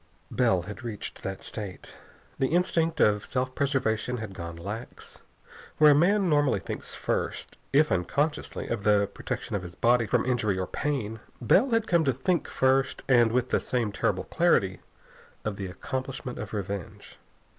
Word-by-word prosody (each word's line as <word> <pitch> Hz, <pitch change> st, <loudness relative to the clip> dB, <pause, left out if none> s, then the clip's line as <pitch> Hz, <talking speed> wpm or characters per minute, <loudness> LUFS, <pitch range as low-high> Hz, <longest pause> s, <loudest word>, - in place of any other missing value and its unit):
Bell 115 Hz, -9 st, +2 dB
had 100 Hz, +2 st, -8 dB
reached 110 Hz, -4 st, -6 dB
that 95 Hz, 0 st, -5 dB
state. 100 Hz, -4 st, -7 dB, 0.5 s
The 135 Hz, -, +3 dB
instinct 165 Hz, -3 st, +1 dB
of 105 Hz, -1 st, +4 dB
self 130 Hz, 0 st, -2 dB
preservation 125 Hz, -4 st, 0 dB
had 110 Hz, -3 st, -6 dB
gone 85 Hz, -2 st, -6 dB
lax. 100 Hz, +8 st, -8 dB, 0.6 s
Where 150 Hz, -1 st, +8 dB
a -, -, +7 dB
man 185 Hz, +6 st, +3 dB
normally 145 Hz, -5 st, +3 dB
thinks -, -, -6 dB
first, -, -, -3 dB
if 150 Hz, +3 st, +4 dB
unconsciously, 140 Hz, -, -1 dB
of 115 Hz, -4 st, -3 dB
the 105 Hz, -1 st, +4 dB
protection -, -, -4 dB
of 100 Hz, -, -1 dB
his 90 Hz, -1 st, -9 dB
body 120 Hz, -1 st, +3 dB
from 120 Hz, +3 st, +1 dB
injury 110 Hz, -6 st, +1 dB
or 95 Hz, -, -1 dB
pain, 115 Hz, -3 st, -2 dB, 0.2 s
Bell 190 Hz, -, +4 dB
had 225 Hz, -2 st, +2 dB
come 170 Hz, -5 st, +3 dB
to 135 Hz, -, +3 dB
think 160 Hz, +7 st, 0 dB
first, 130 Hz, +1 st, +1 dB
and 120 Hz, -4 st, +5 dB
with 125 Hz, +1 st, +1 dB
the -, -, +2 dB
same 120 Hz, -4 st, -1 dB
terrible 100 Hz, -, 0 dB
clarity, -, -, +2 dB, 0.7 s
of 105 Hz, -1 st, -2 dB
the 95 Hz, -, -4 dB
accomplishment 130 Hz, +6 st, -5 dB
of -, -, -6 dB
revenge. 100 Hz, -3 st, -6 dB
120 Hz, 165 wpm, -27 LUFS, 105-140 Hz, 0.7 s, Where